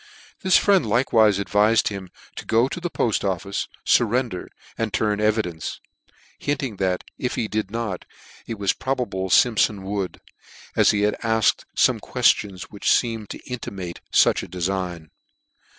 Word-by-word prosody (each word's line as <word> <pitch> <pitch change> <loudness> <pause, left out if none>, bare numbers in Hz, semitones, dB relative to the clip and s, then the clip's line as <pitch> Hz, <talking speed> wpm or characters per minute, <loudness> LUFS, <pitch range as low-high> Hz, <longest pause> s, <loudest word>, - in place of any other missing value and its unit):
This 185 -2 +5
friend 195 -5 +4
likewife. 110 -2 +3
advifed 105 +3 +3
him 100 -3 -7 0.3
to - - -6
go 115 +3 +2
to 155 - -5
the 175 0 -3
Poll 115 -8 0
Office, 100 0 -2 0.2
furrender, 120 -4 +1 0.3
and 115 -2 -2
turn 105 0 0
evidence; 105 -7 -1 0.6
hinting 135 -7 -2
that 95 -1 0 0.2
if 125 - -2
he 110 - -1
did 105 -2 -2
not, 110 -4 -4 0.4
it 115 - -4
was 100 -2 +1
pro 135 +1 -2
bable 95 -7 -3
Siinpfon 105 -2 +3
would: 95 -1 -3 0.6
as - - +5
he 105 - +2
had 105 0 +1
asked 115 -2 +2
fome - - +3
questions 95 -3 +1
which 100 - -6
feemcd 115 -3 +1
to - - -7
intimate 100 -8 -6
fuch - - +4
a - - -8
defign. 90 -3 -3
105 Hz, 150 wpm, -23 LUFS, 95-115 Hz, 0.6 s, This